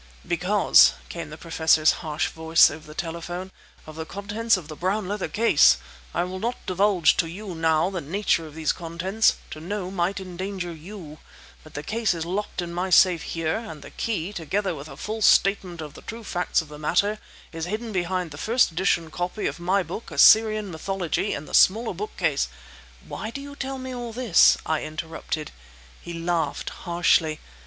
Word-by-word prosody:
"Because," 65 +2 +5 0.2
came - - -6
the 155 - -9
Professor's 160 -1 +3
harsh 155 -3 -1
voice 160 -1 +4
over 155 +1 -10
the 150 - -11
telephone, 175 +2 -5 0.3
"of 155 - -10
the 160 - -3
contents 205 +3 0
of 170 -5 -9
the 155 - -8
brown 190 +4 -1
leather 205 0 -2
case! 230 +2 +5 0.3
I 175 - 0
will 185 +1 -5
not 235 +4 -3
divulge 185 -2 +3
to 165 - +2
you 195 +2 -7
now 160 +2 +2
the 180 -3 -3
nature 165 +1 0
of 150 - -13
these 160 -1 +1
contents; 180 +6 0 0.2
to 155 - -7
know 185 +2 -4
might 190 +1 -1
endanger 185 -1 -5
you. 165 -2 -10 0.4
But 155 - -16
the 145 - -4
case 220 0 0
is 165 -1 -4
locked 190 0 -3
in 170 0 -6
my 180 +2 -2
safe 180 -2 +5
here, 160 -1 -2
and 190 -11 -8
the - - -11
key, 205 -4 -3
together 190 +3 -2
with 150 0 -8
a 135 - -11
full 220 +5 -5
statement 195 -5 +3
of 150 -2 -8
the - - -12
true 230 +1 -8
facts 180 -4 0
of - - -15
the 150 0 -10
matter, 200 +7 +1 0.3
is 165 -1 -4
hidden 215 +5 -4
behind 180 -2 -2
the 145 - -9
first 230 +5 +2
edition 165 -1 0
copy 180 +5 -3
of - - -2
my 185 +3 +1
book 180 +7 -7
'Assyrian 215 -2 +5
Mythology,' 190 +3 -2
in 145 - -6
the - - -13
smaller 225 +5 +4
bookcase—" 425 +1 -1 0.6
"Why 215 - -5
do 255 - -6
you 285 0 -9
tell 270 -1 -4
me 260 0 -6
all 240 -2 -6
this?" 235 -7 +5
I 160 -1 0
interrupted. 155 0 -5 0.5
He 170 - -7
laughed 165 -3 -2
harshly. 170 -3 +1
180 Hz, 185 wpm, -25 LUFS, 160-205 Hz, 0.6 s, Because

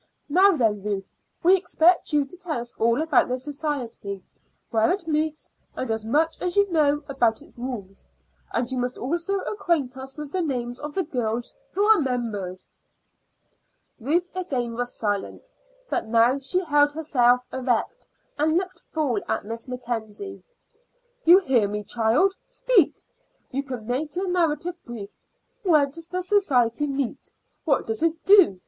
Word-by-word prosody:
Now 370 +3 +5
then, 215 -5 +1
Ruth, 200 -1 -2 0.4
we 365 +3 +7
expect 355 -2 +3
you 295 -2 +3
to 275 - -10
tell 350 -7 -3
us 240 0 -7
all 235 +6 +3
about 320 -4 +3
the 250 - -1
society 255 - -4 0.5
where 225 +4 +3
it 365 -3 -2
meets, 310 0 -1 0.2
and 255 -3 -3
as 220 -1 -1
much 310 +8 +1
as 360 -1 -1
you 405 0 +5
know 295 -2 +2
about 240 -5 +1
its - - -18
rules. 220 -7 -6 0.5
And 240 +1 -1
you 260 - -1
must 245 0 -2
also 340 +8 -1
acquaint 320 -11 -1
us 265 +2 -8
with 300 -2 -6
the 375 - 0
names 245 -6 -3
of 295 0 -7
the 380 - +1
girls 240 -5 -3 0.2
who 400 - +1
are 435 0 +6
members." 220 -9 -3 1.3
Ruth 335 +9 0
again 260 -11 -2
was 245 +1 -2
silent, 205 -2 -3 0.4
but 230 - -2
now 235 +4 +4
she 275 +7 0
held 290 -1 +3
herself 250 -5 +3
erect 260 - -1 0.3
and 315 +2 +3
looked 370 -1 -3
full 290 -10 -1
at - - -1
Miss 230 +4 -6
Mackenzie. 245 - -5 0.8
"You 345 +3 +9
hear 260 - +2
me, 210 +1 -4
child. 230 - +2
Speak. 425 - +2 0.6
You 275 - -1
can 255 -5 -7
make 280 +6 -2
your 370 +1 -1
narrative 345 0 0
brief. 215 -4 -9 0.4
Where 320 -9 +4
does 325 +4 -9
the 365 +1 -3
society 295 - +2
meet? 275 -3 -3 0.3
What 280 -5 +2
does 225 +3 -3
it 325 0 0
do? 385 - +6
275 Hz, 160 wpm, -25 LUFS, 235-335 Hz, 1.3 s, You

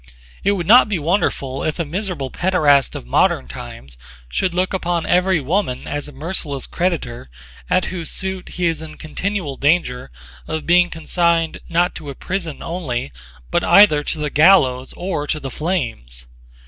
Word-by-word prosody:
It 200 - +3
would 180 -4 -2
not 235 +4 +7
be 200 - 0
wonderful 145 -5 -1
if 155 - -1
a 170 - -1
miserable 170 - -4
paederast 150 -7 +3
of - - -6
modern 60 +1 +2
times 65 0 -10 0.3
should 185 - 0
look 180 +2 0
upon 175 -3 -1
every 180 -1 +3
woman 150 -1 -1
as 145 0 -3
a - - -10
merciless 145 -1 -4
creditor 155 - -2 0.4
at 185 - +2
whose 170 -3 -3
suit 190 -1 -3
he 180 - -2
is 165 -2 0
in 155 -1 -9
continual 165 -3 -3
danger 140 - +1 0.4
of 160 -1 -3
being 175 +1 +4
consigned 165 0 0
not 175 +1 +2
to 150 -2 -8
a 140 - -6
prison 175 -3 -4
only 135 - -3 0.4
but - - +1
either 155 -8 +6
to - - -3
the 150 -1 -3
gallows 140 -6 +4
or 170 -5 -3
to 155 - -1
the 135 -2 -6
flames. 115 - -3
165 Hz, 165 wpm, -20 LUFS, 140-180 Hz, 0.4 s, not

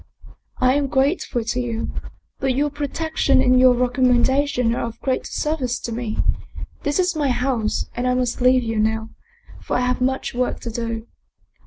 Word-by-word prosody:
"I 255 0 +3
am 285 0 +1
grateful 265 -2 0
to 235 +2 -2
you, 235 -2 -3 0.5
but 265 -2 0
your 290 +2 +1
protection 290 0 0
and 255 0 +4
your 255 -1 +6
recommendation 250 0 +2
are - - -2
of 230 - -9
greater 260 -2 -1
service 275 -5 -1
to 235 - -6
me. 225 -1 -3 0.6
This 290 0 0
is 365 -2 +1
my 295 -3 +1
house, 245 -3 0
and 245 +1 -1
I 250 - +2
must 250 -1 -1
leave 255 0 +4
you 225 -1 -2
now, 220 +1 0 0.5
for - - -3
I - - +2
have 250 0 0
much 265 +1 0
work 250 0 -1
to 235 - -5
do. 230 -1 -4
250 Hz, 175 wpm, -22 LUFS, 235-270 Hz, 0.6 s, your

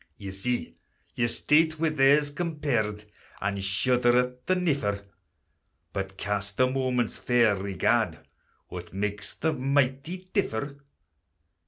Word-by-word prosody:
Ye 100 -1 -7
see 110 +6 -3 0.4
your 120 - +1
state 155 +6 +2
wi' 165 0 +2
theirs 145 0 +4
compared, 140 -11 -1 0.3
And 100 0 -2
shudder 120 +5 +3
at 125 0 -1
the 185 - +3
niffer; 140 - 0 0.9
But 95 0 -4
cast 100 +1 -3
a 130 - +6
moment's 130 -2 0
fair 120 -4 +3
regard, 100 0 +1 0.5
What 90 0 -8
makes 105 +1 -3
the 160 -1 0
mighty 140 +6 0
differ? 145 - -1
125 Hz, 120 wpm, -27 LUFS, 100-145 Hz, 0.9 s, a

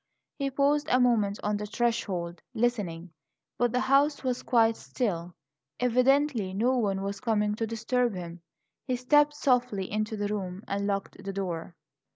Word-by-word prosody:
He 275 -1 0
paused 285 +2 +2
a 255 - +4
moment 220 -5 +2
on 210 0 0
the 210 0 -5
threshold, 200 -7 -1
listening; 200 -8 -1 0.5
but 240 0 +2
the 250 +1 +1
house 285 +2 +3
was 255 -1 -1
quite 230 -2 +3
still; 175 -10 -3 0.4
evidently 250 -4 +2
no 245 +6 +2
one 200 -5 0
was 200 0 -3
coming 210 -4 +1
to 225 +1 -2
disturb 230 +1 0
him. 175 -1 -7 0.5
He 255 - +1
stepped 295 +4 +3
softly 245 -9 +1
into 215 +1 -2
the 205 0 -1
room 195 -2 -4
and 200 0 -1
locked 200 -1 -3
the 195 - -4
door. 180 -3 -4
220 Hz, 160 wpm, -28 LUFS, 195-250 Hz, 0.5 s, a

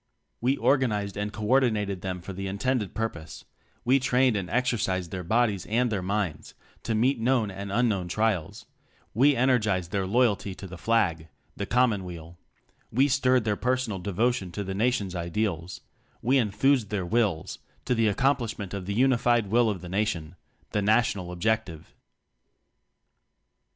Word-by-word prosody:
We 130 +4 +2
organized 105 -8 +1
and 105 0 -3
co 105 0 -6
ordinated 105 -7 +1
them 90 -2 -4
for 95 +3 -7
the 95 +1 -5
intended 105 +2 -1
pur 110 0 0
pose; 80 -5 -11 0.4
we 130 +3 +4
trained 125 -2 +2
and 95 -3 -3
exercised 105 -7 0
their 90 -1 -4
bodies 105 0 +1
and 120 +2 +1
their 100 -3 -1
minds 95 -4 -3 0.3
to 115 - -2
meet 125 +4 +2
known 115 -3 +1
and 100 +1 -6
unknown 105 -5 +1
trials; 100 -4 -1 0.5
we 140 +6 +4
energized 110 -9 +1
their 95 -2 -1
loyalty 105 -3 +1
to 100 - -9
the 90 -2 -9
Flag 85 -9 +1 0.3
the 100 - -4
Com 125 0 +3
monweal; 85 -4 -7 0.5
we 135 +5 +3
stirred 130 -2 +2
their 105 -2 0
personal 125 -2 -1
de 100 +3 -4
votion 110 -2 0
to 100 - -3
the 95 0 -4
Nation's 105 -3 0
ideals; 85 0 -3 0.4
we 130 +4 +3
en 110 -4 +1
thused 120 +1 +2
their 100 -4 -2
wills 105 -5 0 0.3
to - - +1
the 115 -2 +2
accomplish 120 +2 +1
ment 100 -3 -6
of 95 -2 -5
the 100 - -2
unified 120 -4 +2
Will 120 0 +4
of 95 -5 -3
the 90 - -8
Nation 90 -4 -2 0.4
the 105 - 0
National 100 -4 +1
Objective. 90 -3 -2
105 Hz, 165 wpm, -27 LUFS, 95-120 Hz, 0.5 s, we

